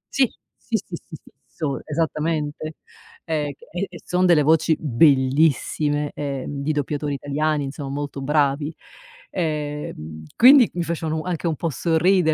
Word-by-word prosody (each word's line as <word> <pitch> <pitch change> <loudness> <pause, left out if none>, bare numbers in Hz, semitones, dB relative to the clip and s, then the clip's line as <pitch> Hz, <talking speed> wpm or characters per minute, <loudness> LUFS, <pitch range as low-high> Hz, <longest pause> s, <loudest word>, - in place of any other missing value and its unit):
Sì! 265 -4 +3 0.2
Sì, 230 - -2
sì, 180 -3 -7
sì, 160 - -10
fisso, 135 +1 -6
esattamente. 155 0 -2 0.5
Ehm, 150 -3 -1
che - - -18
e 185 +3 -2
e 175 - -10
son 180 +1 +2
delle 165 -4 +5
voci 160 +1 +3
bellissime, 145 +2 +2
ehm, 140 0 -4
di 145 +2 0
doppiatori 145 0 -2
italiani, 145 +2 -1
insomma, 140 0 -5
molto 140 0 -4
bravi. 145 +1 +1 0.6
Ehm, 150 - -4
quindi 255 0 +8
mi 175 - 0
facevano 160 -1 -2
u - - -9
anche 175 -1 -2
un 160 - 0
po' 165 - -2
sorridere, 165 +3 +2
150 Hz, 145 wpm, -22 LUFS, 145-165 Hz, 0.6 s, quindi